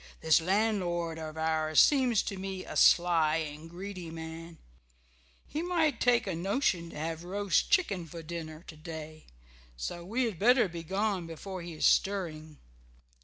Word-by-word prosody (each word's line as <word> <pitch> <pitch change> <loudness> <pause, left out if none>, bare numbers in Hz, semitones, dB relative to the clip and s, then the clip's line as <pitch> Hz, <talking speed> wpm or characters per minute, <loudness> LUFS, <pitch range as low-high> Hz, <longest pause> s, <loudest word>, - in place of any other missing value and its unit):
This 160 +1 +4
landlord 175 -4 0
of 155 0 -7
ours 160 -1 +1
seems 255 -6 +4
to 200 - -4
me 190 0 -5
a - - -8
sly 165 -3 +5
and 155 0 -5
greedy 180 0 -7
man; 165 +1 -8 0.9
he 310 - -4
might 335 -4 +1
take 245 -1 +3
a 190 - -2
notion 180 - 0
to - - -10
have 160 +2 -4
roast 200 +2 0
chicken 195 - +1
for 165 +1 -9
dinner 160 -1 -7
to 160 - -10
day, 155 0 -9 0.5
so 60 - -5
we 230 +8 -1
had 220 -9 -2
better 245 +1 +5
be 170 -1 -7
gone 190 +1 -1
before 185 +3 -7
he 170 0 -7
is - - 0
stirring." 160 -6 +1
170 Hz, 160 wpm, -30 LUFS, 160-200 Hz, 0.9 s, sly